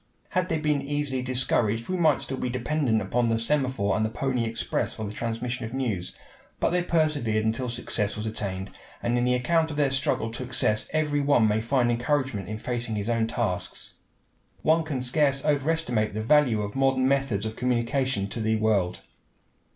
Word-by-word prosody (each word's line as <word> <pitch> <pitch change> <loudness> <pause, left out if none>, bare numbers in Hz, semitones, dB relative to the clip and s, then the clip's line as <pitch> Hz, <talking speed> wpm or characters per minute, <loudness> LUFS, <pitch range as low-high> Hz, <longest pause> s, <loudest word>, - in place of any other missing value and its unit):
Had 185 -1 0
they 160 - +1
been 150 -2 +1
easily 140 -2 -2
discouraged 120 -3 +1
we 185 - -1
might 160 -6 +3
still 135 - -4
be 125 - -1
dependent 130 -1 0
upon 120 +4 +1
the 115 - +2
semaphore 125 -4 +1
and 110 - +1
the 110 - +1
pony 125 0 -1
express 115 0 -2
for 110 - -4
the 100 - -5
transmission 120 +3 -3
of 115 +3 -5
news. 110 -9 -2 0.5
But - - +2
they 180 0 +2
persevered 150 -11 +1
until 115 +3 0
success 115 -4 -2
was 105 - -4
attained, 100 -3 -3 0.3
and 120 +1 +1
in 120 0 +2
the 125 0 +3
account 160 +6 +2
of 150 - -5
their 145 -2 +2
struggle 135 -4 0
to 115 - -6
success 115 -4 0
every 150 -2 +1
one 140 -6 +4
may 105 +1 +1
find 120 +1 +2
encouragement 120 -4 -1
in 110 - -3
facing 120 0 -3
his 105 +2 -2
own 115 -1 +1
tasks. 115 -5 -3 0.7
One 160 +1 +4
can 145 -5 -3
scarce 140 +2 +2
overestimate 140 -8 +1
the 110 - -2
value 120 -4 +4
of 105 0 -5
modern 135 -1 +2
methods 135 -7 +1
of 110 0 -4
communication 125 -2 0
to 115 - -4
the 110 0 +1
world. 105 -5 +1
125 Hz, 190 wpm, -26 LUFS, 110-140 Hz, 0.7 s, one